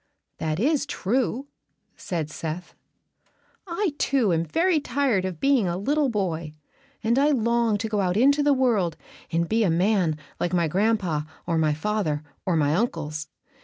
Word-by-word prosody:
"That 155 0 -1
is 285 +4 +1
true," 255 +2 -1 0.5
said 160 -4 -4
Seth. 165 +3 -5 0.9
"I, 345 -1 -1
too, 245 -9 +2
am 165 0 +1
very 330 - +2
tired 255 -8 0
of 180 -4 -4
being 275 -8 +3
a 175 0 -1
little 285 +8 +1
boy, 170 -8 -2 0.5
and 235 +4 +2
I 290 +2 +4
long 235 -4 +2
to 220 +2 -3
go 210 -2 0
out 185 0 0
into 280 +5 +4
the 290 0 +3
world 230 - +2 0.3
and 170 +1 +1
be 225 +3 +2
a 195 - +2
man 175 -2 +2 0.2
like 175 - -1
my 170 -2 +2
gran'pa 185 -4 0 0.2
or 165 -2 0
my 155 -2 +2
father 160 -4 -1 0.2
or 180 - +2
my 150 -2 +2
uncles. 155 -7 -2
200 Hz, 165 wpm, -25 LUFS, 165-255 Hz, 0.9 s, I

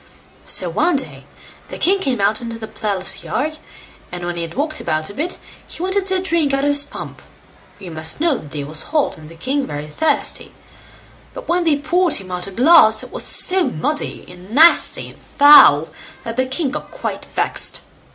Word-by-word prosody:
So 180 - +1
one 300 - +1
day 270 - -6 0.4
the - - -8
king 390 +3 +2
came 265 - -1
out 210 +3 +1
into 230 -1 -6
the 225 - -7
palace 200 -4 -2
yard, 310 +2 -3 0.5
and 175 0 -6
when 175 0 -4
he 170 - -4
had 165 0 -6
walked 305 +3 -2
about 155 +3 -2
a - - -12
bit, 325 - -3 0.3
he 340 - -6
wanted 380 +1 0
to 380 -1 +1
drink 330 -6 0
out 275 - -2
of 290 - +2
his 285 0 +3
pump; - - -9 0.6
for 205 - -17
you 180 - -8
must 160 - -1
know 320 -4 +1
the - - -12
day 145 0 -6
was 150 +2 -3
hot, 300 - -1
and 155 -1 -13
the 165 - -13
king 265 - -2
very 145 0 -6
thirsty; 295 - -1 0.8
but - - -9
when 350 0 0
they 305 -3 +2
poured 350 +4 +1
him 185 -2 -5
out 180 0 -4
a - - -8
glass, 245 - +5
it - - -11
was - - -2
so 370 -1 +3
muddy, 295 - -3
and 180 +1 -14
nasty, 315 +9 +4
and - - -18
foul, 285 - +6 0.3
that 230 0 -6
the 260 +1 0
king 265 +1 -2
got 300 - -6
quite - - -6
vexed. - - -1
265 Hz, 205 wpm, -18 LUFS, -, 0.8 s, foul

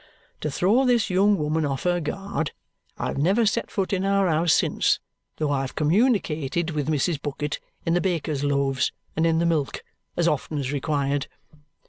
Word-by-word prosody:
To 150 - -2
throw 200 - +3
this 240 -6 +2
young 200 +2 +4
woman 155 +1 0
off 135 -3 -2
her 175 0 +2
guard, 170 -1 -3 0.4
I - - -3
have - - -3
never 195 +10 +3
set 215 - 0
foot 195 -1 -2
in 190 -1 0
our 195 -1 +2
house 165 0 +2
since, - - +2 0.4
though 155 -2 0
I've 135 -2 -2
communicated 170 - +1
with 150 -1 -2
Mrs. 155 0 0
Bucket 150 0 -3 0.3
in 165 - +2
the 175 - +2
baker's 160 -6 -1
loaves 140 -2 +1 0.2
and 160 +1 +2
in 165 0 +2
the 170 - +2
milk 160 -5 0 0.3
as 170 - +2
often 150 0 -1
as 135 -1 -2
required. 145 -1 -1
160 Hz, 175 wpm, -25 LUFS, 145-185 Hz, 0.4 s, young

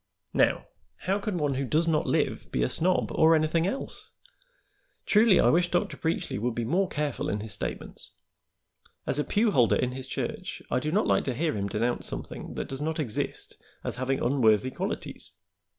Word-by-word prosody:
Now, - - +2 0.4
how 195 +2 0
can 205 -2 -2
one 145 -3 0
who 135 +1 -1
does 155 +6 +1
not 155 -2 +1
live - - 0
be 60 - +1
a 60 - +1
snob 180 +2 +2
or 160 +1 +5
anything 160 +2 +2
else? 265 +7 -5 1.0
Truly, 215 -2 +5
I - - +5
wish 175 +1 +3
Dr. 175 - 0
Preachly 160 -10 -2
would 120 +1 -1
be 120 - -1
more 180 +10 +2
careful 150 -1 -2
in 105 - -2
his 110 -2 -5
statements. - - -6 1.0
As 145 - +2
a - - +2
pew 215 +6 +2
holder 125 - +4
in 125 - 0
his 130 +1 -7
church - - -4
I - - +2
do 150 +4 -2
not 205 +5 +2
like - - +2
to 130 - -1
hear 160 +3 0
him 100 -1 -1
denounce 120 +3 -1
something - - -6
that - - -3
does 135 +1 -5
not 160 +1 -1
exist 125 -9 -3 0.3
as - - -3
having 130 +1 0
unworthy 120 -2 +3
qualities. - - -4
150 Hz, 190 wpm, -28 LUFS, 125-170 Hz, 1.0 s, or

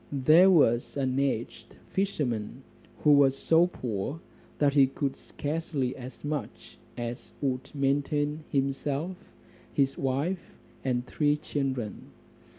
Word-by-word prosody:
There 155 +7 +6
was 135 -9 +3
an 130 -1 0
aged 115 -4 -2 0.2
fisherman, 135 - -2 0.4
who 150 - +6
was 140 -2 +5
so 165 +4 +4
poor, 125 - -4 0.4
that 145 -2 +3
he 140 -2 +6
could 135 0 -2
scarcely 145 -4 -3
as 130 0 -10
much 145 -2 -5 0.2
as 120 +1 -6
would 135 -1 -2
maintain 145 +2 0
himself, 140 +5 -1 0.6
his 135 -1 +1
wife, 145 +8 -2 0.3
and 125 -2 0
three 145 +2 +1
children. 135 -7 -3
140 Hz, 115 wpm, -28 LUFS, 130-150 Hz, 0.6 s, There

